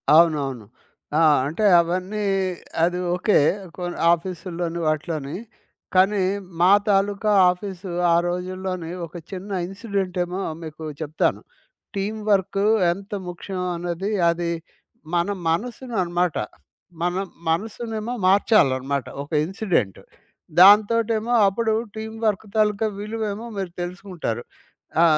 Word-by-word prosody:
అవునవును. 145 -8 +3 0.5
ఆ! - - +4 0.2
అంటే 160 +9 -2 0.2
అవన్నీ 185 +5 -2 0.6
అది 180 +1 +1 0.2
ఓకే. 190 +4 +3 0.4
కొ 180 - -6 0.3
ఆఫీస్సులోని 170 -1 -4
వాటిలోని. 155 0 -2 0.6
కానీ, 190 +1 +4 0.4
మా 180 - +6 0.2
తాలూకా 200 +1 +2 0.2
ఆఫీసు, 185 0 -7 0.2
ఆ - - +5
రోజుల్లోనే 185 -1 -3 0.2
ఒక 155 - -16 0.2
చిన్న 195 +2 -6 0.2
ఇన్సిడెంటేమో 190 -2 -2 0.2
మీకు 160 0 -8 0.2
చెప్తాను. 155 0 0 0.5
టీమ్ 205 +3 -2
వర్కు 195 +1 +2 0.3
ఎంత 195 +4 -7 0.2
ముఖ్యం 185 +1 -5
అనేది 175 +4 -3 0.2
అది 170 0 -1 0.6
మన 175 +1 +2 0.2
మనసుననమాట. 180 - -1 0.6
మన 175 +1 0 0.3
మనసునేమో 220 +5 -2
మార్చాలన్నమాట. 140 - +3 0.2
ఒక 145 - -16
ఇన్సిడెంట్. 180 - -1 0.6
దాంతోటేమో 220 +4 +5
అప్పుడు 220 +3 +1 0.2
టీమ్ 220 0 -6
వర్క్ 210 -1 +1
తాలూకా 215 0 +2
విలువేమో 215 0 -4
మీరు 190 -3 -3
తెలుసుకుంటారు. 175 - -4 0.6
ఆ! - - +7
185 Hz, 100 wpm, -23 LUFS, 170-205 Hz, 0.6 s, ఆ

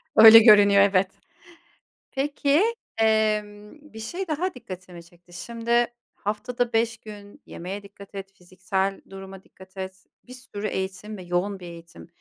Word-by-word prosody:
Öyle 225 +1 +11
görünüyor, 205 -3 +7
evet. 195 -1 +3 1.0
Peki, 285 +4 +1 0.3
emm, 215 +4 -1
bir 220 - -9
şey 350 +12 -5
daha 340 +5 -2
dikkatimi 185 -7 -10
çekti. 175 0 -22
Şimdi 235 +5 0 0.3
haftada 235 +4 -3
5 225 0 +1
gün 210 +4 -13
yemeğe 195 +4 -7
dikkat 200 0 -14
et, 195 0 -8
fiziksel 190 +2 -3
duruma 195 0 -10
dikkat 190 +1 -18
et, 190 +1 -7 0.2
bir 250 - -11
sürü 215 -5 -6
eğitim 190 +2 -5
ve 185 - -9
yoğun 180 +3 -2
bir 180 - -10
eğitim. 170 0 -12
205 Hz, 140 wpm, -24 LUFS, 190-225 Hz, 1.0 s, Öyle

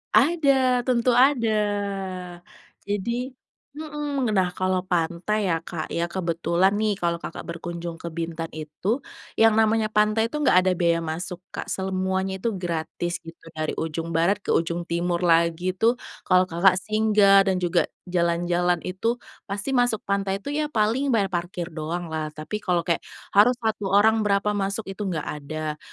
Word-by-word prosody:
Ada, 270 -5 +3
tentu 250 -1 +2
ada. 245 -1 +4 1.4
Jadi 235 +6 -2 0.4
mhm, 295 -4 -3
nah 180 -1 +2
kalau 185 0 -1
pantai 180 +4 0
ya, 165 - +2
Kak, 160 -3 -5
ya, 170 0 -1
kebetulan 170 +2 +1
nih 215 -1 +1
kalau 170 -1 +1
Kakak - - -7
berkunjung 170 0 -5
ke 170 - -11
Bintan 165 0 -3
itu, 155 - -3 0.3
yang 225 -1 +4
namanya 220 0 +3
pantai 215 +1 +2
itu, 300 - -4
enggak 225 -11 +4
ada 185 0 +2
biaya 170 -1 +2
masuk, 175 +3 -5
Kak. - - -6
Semuanya 190 0 -1
itu 225 +3 -2
gratis 175 -1 -3
gitu 165 0 -11 0.2
dari 155 0 -1
ujung 165 +1 -4
barat 170 +5 +3
ke - - +1
ujung 170 +1 0
timur 175 +1 -1
lagi 170 +2 +2
tuh, 230 +6 +2 0.2
kalau 185 0 +4
Kakak 185 +2 +3
singgah 210 -2 +5
dan 185 - +1
juga 175 -1 +1 0.2
jalan-jalan 175 0 +1
itu, 205 +6 -1 0.3
pasti 200 +6 -3
masuk 245 -3 +2
pantai 195 -1 0
itu 245 +8 -6
ya 300 0 0
paling 230 +4 +1
bayar 200 -5 +2
parkir 175 0 -3
doang 165 +3 -3
lah. 155 -1 -2
Tapi 155 +8 -5
kalau 175 -2 +1
kayak 170 -2 +1 0.3
harus 220 +5 +6
1 220 -4 -2
orang 220 +3 +4
berapa 200 +1 +2
masuk 200 +2 -2
itu 195 - -8
enggak 165 -5 -2 0.2
ada, 155 +1 -4
190 Hz, 155 wpm, -24 LUFS, 170-220 Hz, 1.4 s, harus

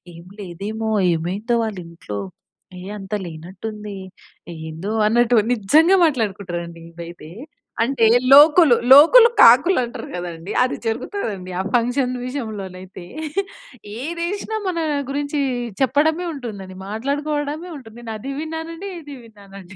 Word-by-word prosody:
ఏం 170 +1 -13 0.2
లేదేమో, 205 +5 -5 0.3
ఏమైందో 200 +9 -2
వాళ్ళ 215 -3 -4
ఇంట్లో. 135 -12 -7 0.6
ఏ - - -9 0.2
అంత 195 +2 -8
లేనట్టు 170 +5 -10
ఉంది, 210 -2 -8 0.6
ఏందో" 160 +5 -6 0.2
అన్నట్టు 240 +2 +3 0.2
నిజంగా 310 - +4
మాట్లాడుకుంటారండి 185 - -4
ఇదైతే. 170 -1 -10 0.5
అంటే, 240 -2 +1 0.3
లోకులు 300 0 +8 0.2
లోకులు 335 - +9
కాకులు 265 +11 +7
అంటారు 235 - -7
కదండీ, 175 +1 -6
అది 255 - -1
జరుగుతదండి 225 - -4
ఆ - - +1
ఫంక్షన్ 250 +2 +1
విషయంలోనైతే. 195 -8 -7 1.0
ఏదేసినా 345 +8 -3
మన 355 -2 -1 0.3
గురించి 285 +1 -2 0.4
చెప్పడమే 310 +6 +2
ఉంటుందండి, 200 -8 -8
మాట్లాడుకోవడమే 290 - -3
ఉంటుంది. 230 -4 -14
నేను 225 -2 -6
అది 270 +6 -6
విన్నానండి, 325 +4 -6
ఇది 290 -2 -10
విన్నానండి 195 -4 -14
230 Hz, 110 wpm, -20 LUFS, 190-290 Hz, 1.0 s, లోకులు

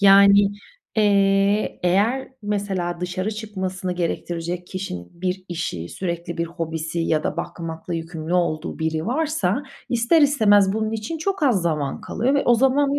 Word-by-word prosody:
Yani, 200 0 +7 0.5
eee, 200 0 +3
eğer 210 +9 +2
mesela 195 -4 -2
dışarı 185 +3 -2
çıkmasını 190 -4 -4
gerektirecek 175 0 -3
kişinin 135 - -5
bir 185 0 -2
işi, 160 - -4
sürekli 170 - -4
bir 170 - 0
hobisi 165 -1 -4
ya 160 -2 +1
da - - -1
bakmakla 165 +2 -5
yükümlü 165 0 -4
olduğu 170 -2 0
biri 160 +1 -1
varsa, 275 - 0 0.3
ister 240 +7 +3
istemez 205 -9 +5
bunun 220 +1 -1
için 225 +9 -4
çok 390 +2 -2
az 240 - +3
zaman 150 -5 -1
kalıyor 250 +6 0
ve 280 - +3
o 240 - +5
zamanı 275 +3 +3
190 Hz, 145 wpm, -23 LUFS, 170-215 Hz, 0.5 s, Yani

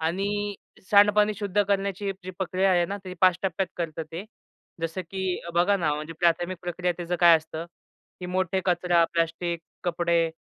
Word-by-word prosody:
आणि 200 +5 -1 0.4
सांडपाणी 210 +1 +5
शुद्ध 205 -1 +1
करण्याची 200 0 0
जी 185 - -5
प्रक्रिया 190 +1 +1
आहे 175 -1 +3
ना 200 +3 -4
ती 185 0 -7
5 185 -2 +6
टप्प्यात 190 0 0
करतं 165 -2 -3
ते. 175 +5 -5 0.6
जसं 165 +3 -3
की 190 -2 -2
बघा 185 +4 +4
ना 155 -5 0
म्हणजे 155 +2 -6
प्राथमिक 175 +1 +1
प्रक्रिया 175 0 -1
त्याचं 175 0 -3
काय 170 -1 +8
असतं? 160 +1 -7 0.5
की 180 - -5
मोठे 185 +1 0
कचरा, 175 -1 +3
प्लास्टिक, 170 0 -1 0.2
कपडे, 170 -1 +1
180 Hz, 160 wpm, -26 LUFS, 170-195 Hz, 0.6 s, काय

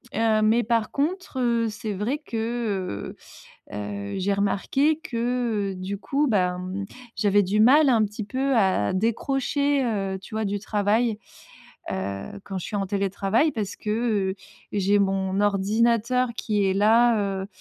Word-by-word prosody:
Heu, 220 -1 +2
mais 225 +3 +3
par 230 -1 0
contre, 310 -1 -2
heu, 235 -2 +2
c'est 210 0 -5
vrai 215 +9 -1
que, 225 - -3 0.6
heu - - -7
heu, 100 -1 -5
j'ai 195 +2 0
remarqué 270 +10 +1
que 230 -5 -1
du 190 +2 -5
coup, 285 +7 0
bah, 180 -7 +1 0.6
j'avais 205 0 +3
du 205 +3 +1
mal 280 +6 +6
un 230 -3 +4
petit 210 +1 -5
peu 260 +4 0
à 190 - +2
décrocher, 270 +6 0
heu, 195 -5 -2
tu 195 - -11
vois, 220 -1 -1
du 200 +1 -1
travail, 210 +2 0 0.7
heu, 100 - -4
quand 195 -1 -5
je 180 - -6
suis 210 - -4
en 195 -1 -1
télétravail. 200 - +1
Parce 205 -3 -4
que, 210 - -5 0.4
heu, - - -4 0.4
j'ai 205 0 +2
mon 195 0 0
ordinateur 230 +5 +2
qui 210 -2 0
est 190 -1 +2
là, 225 +3 +4 0.2
heu, - - -5
210 Hz, 155 wpm, -25 LUFS, 195-235 Hz, 0.7 s, mal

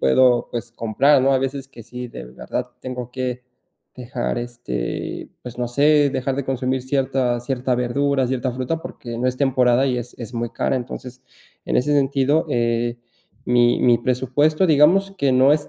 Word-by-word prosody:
puedo, 120 - +4
pues, 120 -1 -5
comprar, 130 +6 +3
¿no? 135 +1 +3
Hay 130 - +2
veces 135 0 -3
que 120 -3 -12
sí, 125 +2 -8
de 60 - -9
verdad 60 +1 -5 0.2
tengo 125 -1 -6
que 125 -1 -3 0.5
dejar, 125 -1 -3
este, 120 - -5
pues, 125 -1 -9
no 120 -1 -1
sé, 145 +3 +4
dejar 130 0 -2
de 140 - -2
consumir 130 0 -1
cierta 130 -2 0
cierta 125 0 -1
verdura, 130 +2 +1
cierta 130 0 -1
fruta 130 +6 -3
porque 120 -6 -7
no 125 - +1
es 125 - -2
temporada 130 -1 +3
y 125 -2 0
es 120 +1 -7
es 115 0 -7
muy 120 -1 -2
cara. - - -1
Entonces, 125 0 -7 0.4
en - - 0
ese 145 +4 +1
sentido, 140 +2 +2
eh, 120 -1 0 0.5
mi 120 0 +3
mi 120 -2 +4
presupuesto, 130 +7 +1
digamos 165 +7 +4
que 140 -2 +2
no 130 +2 +5
es 150 -1 0
130 Hz, 175 wpm, -21 LUFS, 120-135 Hz, 0.5 s, no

